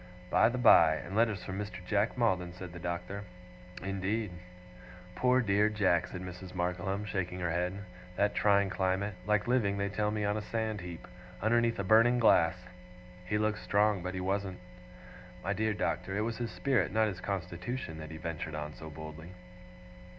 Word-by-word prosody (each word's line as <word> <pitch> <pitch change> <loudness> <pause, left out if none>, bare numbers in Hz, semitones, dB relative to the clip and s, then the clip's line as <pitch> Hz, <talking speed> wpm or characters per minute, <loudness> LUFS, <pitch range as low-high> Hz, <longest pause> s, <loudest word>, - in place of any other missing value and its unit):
'By - - +5
the 125 - -3
by! 85 -10 +7
and 90 +5 -6
letters 110 -3 +2
from 95 0 -5
Mr. 105 -3 -6
Jack 105 +5 +1
Maldon!' 90 -7 +1
said 90 -1 -9
the 85 - -8
Doctor. 90 +4 -4 0.6
'Indeed!' 95 +2 -1 0.8
'Poor 125 0 +3
dear 105 -1 +3
Jack!' 95 -5 +2
said 90 - -7
Mrs. 90 0 -8
Markleham, 90 +3 -1
shaking 90 -3 -3
her 85 -2 -1
head. 90 +4 -2 0.3
'That 105 +2 +2
trying 100 -2 +3
climate! 95 +2 0
like 105 0 +2
living, 110 -5 +2
they 100 0 -1
tell 105 +1 0
me, 105 -1 -1
on 105 0 +1
a - - -2
sand 110 -1 -2
heap, 85 -2 -8 0.3
underneath 115 +2 +2
a 100 - -1
burning 115 +5 +5
glass! 90 -7 +5 0.7
He 105 - +1
looked 105 0 0
strong, 105 -1 +2
but 90 +1 -4
he 95 - -3
wasn't. 95 0 -1 0.9
My 95 - 0
dear 110 +1 0
Doctor, 95 -1 -2
it - - +1
was 115 +1 -2
his 120 -1 -2
spirit, 90 +1 +1
not 110 +1 +3
his 90 -4 -5
constitution, 90 0 -4
that 80 -1 -7
he 80 - -7
ventured 80 -1 -4
on 75 0 -5
so 80 +1 -9
boldly. 80 +2 -9
100 Hz, 180 wpm, -31 LUFS, 90-105 Hz, 0.9 s, by